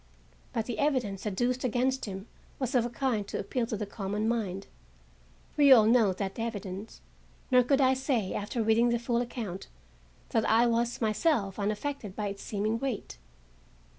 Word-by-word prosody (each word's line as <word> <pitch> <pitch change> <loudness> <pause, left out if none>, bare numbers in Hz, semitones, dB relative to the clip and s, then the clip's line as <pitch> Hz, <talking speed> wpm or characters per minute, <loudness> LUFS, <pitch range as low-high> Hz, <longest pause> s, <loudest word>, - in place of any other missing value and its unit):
But 225 - -2
the 240 - -4
evidence 240 -9 0
adduced 245 +5 0
against 255 +2 0
him 195 -1 -6 0.3
was 260 0 -2
of 240 -2 +3
a - - -7
kind 240 -5 -1
to - - -4
appeal 230 +3 -2
to 220 - -3
the 210 - -3
common 205 +1 -3
mind—we 120 - -2
all 225 -5 +9
know 225 -3 +5
that 190 +3 -4
evidence—nor 220 +4 -3
could 275 +3 +2
I 260 0 +5
say, 260 -7 -1
after 215 +3 -2
reading 225 +2 +4
the 235 - +2
full 235 0 0
account, 225 -6 -5 0.6
that 225 - +1
I 230 +2 +5
was 235 +1 0
myself 215 - +1
unaffected 210 +1 -3
by 210 -2 -2
its 200 0 -7
seeming 215 +2 -1
weight. 230 - -4
225 Hz, 160 wpm, -29 LUFS, 200-245 Hz, 0.6 s, all